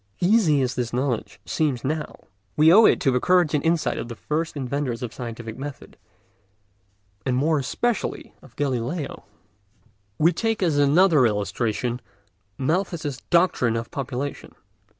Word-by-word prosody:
Easy 175 -8 +3
as 125 0 -1
this 120 -3 -3
knowledge 125 -2 -2
seems 145 -7 -1
now, 150 +3 -3 0.4
we 160 +2 +6
owe 220 +3 +8
it - - +4
to 135 - +3
the 125 - +2
courage 180 0 +3
and 150 - +1
insight 165 0 +1
of - - -5
the 120 - -7
first 155 +5 -3
inventors 130 -2 -3
of 120 - -5
scientific 115 -1 -7
method, 145 0 -8 1.3
and 125 +2 0
more 155 +3 +2
especially 225 - -2
of 120 -4 -18
Galileo. 140 +3 -3 0.9
We 160 - +5
may - - +1
take 225 +2 -1
as 155 -5 +2
another 150 -1 +5
illustration 115 +3 -2 0.6
Malthus's 155 -1 -1
doctrine 170 -10 +3
of 115 0 -4
population. 135 +1 -5
140 Hz, 145 wpm, -24 LUFS, 125-165 Hz, 1.3 s, owe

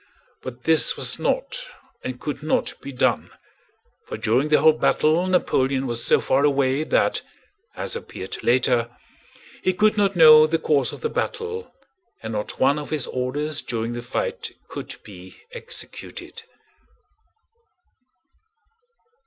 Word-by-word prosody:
But 125 -1 -9
this 160 -1 +4
was - - +1
not - - -1 0.4
and 130 -1 -5
could 150 -1 -5
not 155 - 0
be 140 - -7
done, 125 - 0 0.8
for - - -5
during 125 +7 +1
the 150 - +5
whole 160 - +6
battle 155 +3 +2
Napoleon 135 -7 +1
was 120 -2 -1
so - - +4
far 135 +2 +1
away 140 0 +2
that, - - +1 0.5
as - - -3
appeared 470 - -7
later, 120 -1 +2 0.7
he 185 - +1
could 215 +2 +3
not 200 -1 +2
know 155 -2 +8
the 165 +1 +1
course 145 -4 +1
of - - -10
the 460 - -1
battle 455 0 -4 0.5
and 110 0 -5
not 105 0 -5
one 140 +3 +3
of 150 - -7
his 155 -4 -1
orders 145 +4 -2
during 115 -1 -3
the 120 - -5
fight 120 - -4 0.2
could - - -7
be 95 -2 -13
executed. 485 -1 -8
145 Hz, 135 wpm, -23 LUFS, 125-165 Hz, 0.8 s, know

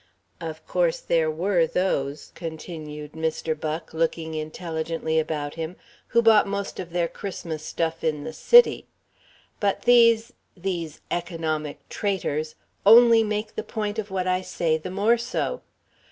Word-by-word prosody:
Of 160 -2 -7
course 175 -2 +1
there 165 -2 +1
was 170 +1 +1
those," 145 -6 -1
continued 155 -3 -7
Mr. 160 0 -2
Buck, 155 +1 -5
looking 160 0 -1
intelligently 160 0 -2
about 150 -2 -3
him, 165 +2 -5 0.3
"who 235 0 +3
bought 220 -3 +6
most 200 0 -4
of 180 - -5
their 170 0 0
Christmas 165 -5 -6
stuff 165 +1 -2
in 150 -2 0
the 160 +1 -6
City. 480 - +5 0.7
But 200 -2 0
these 230 -2 +5 0.2
these 170 -4 -4
economic 160 -4 -3
traitors 155 -6 -2 0.3
only 230 +2 +8
make 210 0 -3
the - - -3
point 215 -1 -3
of 210 -1 -4
what 190 -1 -2
I 185 0 +1
say 170 -3 0
the 160 +3 -5
more 210 +5 +2
so. 245 - -2
170 Hz, 140 wpm, -25 LUFS, 160-200 Hz, 0.7 s, only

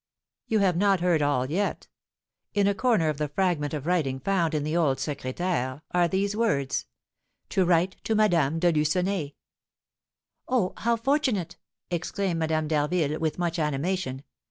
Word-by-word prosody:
"You 220 - +2
have 190 -4 +2
not 195 -1 +3
heard 175 -3 +2
all 140 -2 +1
yet. 200 +5 -1 0.7
In 200 -1 +3
a 200 - +3
corner 200 -5 +2
of 150 -1 -3
the 150 - 0
fragment 150 -2 0
of 145 -1 -5
writing 155 -7 0
found 170 +1 0
in 150 - 0
the 155 +2 -2
old 150 -6 +2
secrétaire, 145 -1 -3
are 175 -1 +3
these 195 +4 -1
words, 145 - 0 0.6
'To 190 - +2
write 175 +2 +2
to 220 - +1
Madame 170 -8 +3
de 175 +1 +3
Lucenay.'" 160 0 0 1.1
"Oh, 240 -8 +1
how 235 +1 +1
fortunate!" 245 - 0 0.3
exclaimed 175 +1 -1
Madame 160 -1 0
d'Harville, 155 0 0
with 160 -2 -1
much 170 -1 -1
animation. 150 -2 -1
170 Hz, 155 wpm, -26 LUFS, 150-190 Hz, 1.1 s, not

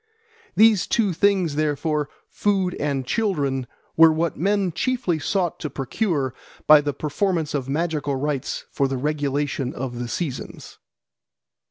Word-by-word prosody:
These 220 -3 +5
two 210 -6 +1
things, 185 -3 +2
therefore, 150 0 -1 0.2
food 195 -3 0
and 140 -3 -1
children, 140 - -1 0.3
were 165 0 +8
what 160 0 -1
men 195 +2 +1
chiefly 185 -2 -1
sought 175 +3 -1
to 155 - -4
procure 140 - -1 0.3
by 150 -1 +8
the 145 0 -1
performance 160 +3 -1
of 135 -2 -2
magical 150 -2 -1
rites 140 0 -3
for 140 - +1
the 135 0 -2
regulation 145 -1 -1
of 125 -2 -5
the 120 - -3
seasons. 140 0 -5
150 Hz, 135 wpm, -23 LUFS, 140-180 Hz, 0.3 s, were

